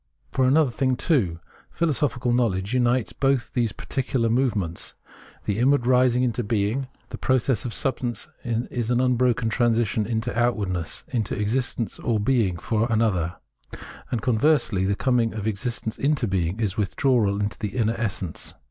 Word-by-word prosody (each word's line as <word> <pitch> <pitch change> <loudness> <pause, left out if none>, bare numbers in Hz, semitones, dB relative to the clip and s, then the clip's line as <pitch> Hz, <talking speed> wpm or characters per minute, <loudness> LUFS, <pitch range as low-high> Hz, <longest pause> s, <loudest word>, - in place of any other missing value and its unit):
For 130 -1 +2
another 140 0 +4
thing, 130 +1 +1
too, 115 - +1 0.3
philosophical 145 -6 0
knowledge 105 -4 0
unites 125 -1 +1
both 135 -3 0
these 120 -4 +1
particular 130 -2 -1
movements. 110 -9 -1 0.5
The 105 +1 -1
inward 135 0 +3
rising 125 0 +4
into 120 -1 0
being, 110 +4 0 0.2
the - - -7
process 130 -3 +1
of 120 - -3
substance, 130 -2 -1 0.2
is 120 -1 -2
an 120 0 +2
unbroken 125 -2 +2
transition 115 -2 +1
into 115 +1 -2
outwardness, 100 -8 -1
into 115 -6 -2
existence 115 +1 -1
or 115 -3 0
being 105 -5 +1
for 115 +6 -1
another; 95 -7 +1 0.7
and 115 -3 -2
conversely, 120 -5 +2
the 100 +1 +1
coming 120 -2 +1
of 105 -2 -4
existence 110 +1 -3
into 140 -4 +1
being 95 0 -1
is 105 -3 -1
withdrawal 105 -1 +1
into 105 0 -2
the 105 +2 -4
inner 115 -1 +2
essence. 100 -7 -3
115 Hz, 150 wpm, -24 LUFS, 105-125 Hz, 0.7 s, another